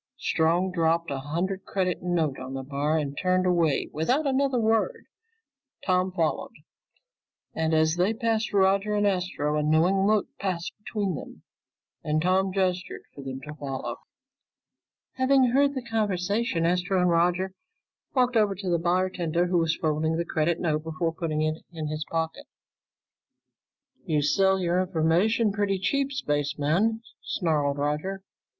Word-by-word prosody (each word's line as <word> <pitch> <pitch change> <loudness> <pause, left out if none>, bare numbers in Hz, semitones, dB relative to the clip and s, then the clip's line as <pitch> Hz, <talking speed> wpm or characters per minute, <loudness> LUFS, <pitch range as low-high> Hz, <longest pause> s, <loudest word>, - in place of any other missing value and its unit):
Strong 170 +4 +1
dropped 165 -2 +1
a 135 - -2
hundred 175 +7 -3
credit 185 -2 -1
note 165 -6 0
on 130 +1 -6
the 135 - -4
bar 145 +3 0
and 145 -2 -2
turned 185 +3 +1
away 170 -5 +2
without 250 - +1
another 270 -2 +1
word. 225 - +1 0.8
Tom 185 0 +2
followed, 165 -4 -1 1.0
and 160 0 0
as 160 +1 +2
they 185 +4 +2
passed 225 -1 -1
Roger 200 +1 +2
and 205 0 +2
Astro, 180 -6 0
a 150 - +1
knowing 170 +6 +3
look 215 -1 +3
passed 180 -3 -3
between 205 -3 -2
them, 145 - -9 0.6
and 155 0 0
Tom 185 +3 +2
gestured 185 -1 -1
for 140 - -10
them 135 0 -6
to 150 +1 -8
follow. 140 -3 -5 1.2
Having 260 -1 +4
heard 280 +2 +3
the 260 - -3
conversation, 205 -3 0
Astro 180 +2 +1
and 180 - +3
Roger 180 +3 +1 0.6
walked 250 -1 +2
over 210 -3 +3
to 190 0 -4
the 170 - +2
bartender 175 -1 0
who 180 -1 +1
was 165 -1 +1
folding 160 +1 0
the 170 - -1
credit 165 +1 0
note 155 -3 0
before 160 +1 -2
putting 155 -2 -2
it 155 +1 -2
in 155 -3 -5
his 155 0 -3
pocket. 160 -1 -3 1.6
"You 150 -2 0
sell 190 +6 +3
your 180 0 +1
information 185 +6 +2
pretty 200 -1 0
cheap, 275 +9 0
spaceman," 160 - 0 0.2
snarled 150 -6 0
Roger. 150 +7 -2
180 Hz, 145 wpm, -26 LUFS, 155-195 Hz, 1.6 s, Having